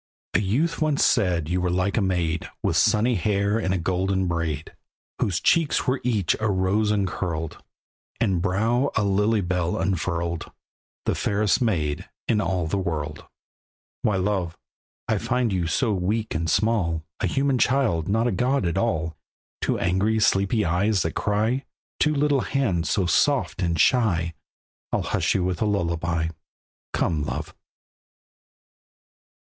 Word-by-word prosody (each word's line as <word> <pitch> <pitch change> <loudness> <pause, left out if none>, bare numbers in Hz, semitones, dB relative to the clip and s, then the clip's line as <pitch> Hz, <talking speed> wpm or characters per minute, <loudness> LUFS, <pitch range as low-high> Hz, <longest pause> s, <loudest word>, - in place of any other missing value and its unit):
A - - +4
youth 125 - 0
once 155 -2 +2
said 90 -8 +2
you 90 +2 0
were 90 - 0
like 90 +3 0
a 115 - +2
maid 85 -4 -1
With 80 - +1
sunny 110 +6 +3
hair 100 +1 +1
in 95 -4 -1
a 95 - +1
golden 95 +2 0
braid; 85 -3 -3 0.4
Whose 90 -3 0
cheeks 165 -3 +2
were 130 -1 0
each 110 -8 +1
a 110 0 0
rose 100 +3 +1
uncurled; 90 -5 -2 0.6
And 95 -6 +1
brow 110 +8 +1
a 105 - +2
lilybell 95 -4 +1
unfurled; 85 -2 -2 0.5
The - - +1
fairest 105 +2 +1
maid 80 -11 -1 0.2
in 105 -2 +2
all 90 -5 -1
the 95 +5 -1
world. 75 -4 -4 0.7
Why 105 - +1
love! 95 -3 -1 0.5
I - - +1
find 125 -4 0
you 90 -3 0
so 115 +5 +1
weak 105 +4 -1
and 80 0 -1
small, 95 -6 +1 0.2
A - - 0
human 135 -2 +1
child, 115 - +2
not 110 +3 +2
a 120 - +2
god 125 +4 +1
at 85 +3 0
all; 80 -8 -1 0.5
Two - - 0
angry, 95 +5 +1
sleepy 105 +1 +2
eyes 95 +3 +1
that 80 - -2
cry, 110 +6 0 0.4
Two 150 0 +2
little 145 -2 +2
hands 95 - 0
so 95 - +1
soft 135 +3 +1
and 85 -3 0
shy, 85 - +2 0.6
I'll - - 0
hush - - 0
you 95 - +1
with 90 -2 -2
a - - +3
lullaby. 85 -4 0 0.6
Come, 80 -3 0
love! - - -4
95 Hz, 150 wpm, -24 LUFS, 85-110 Hz, 0.7 s, A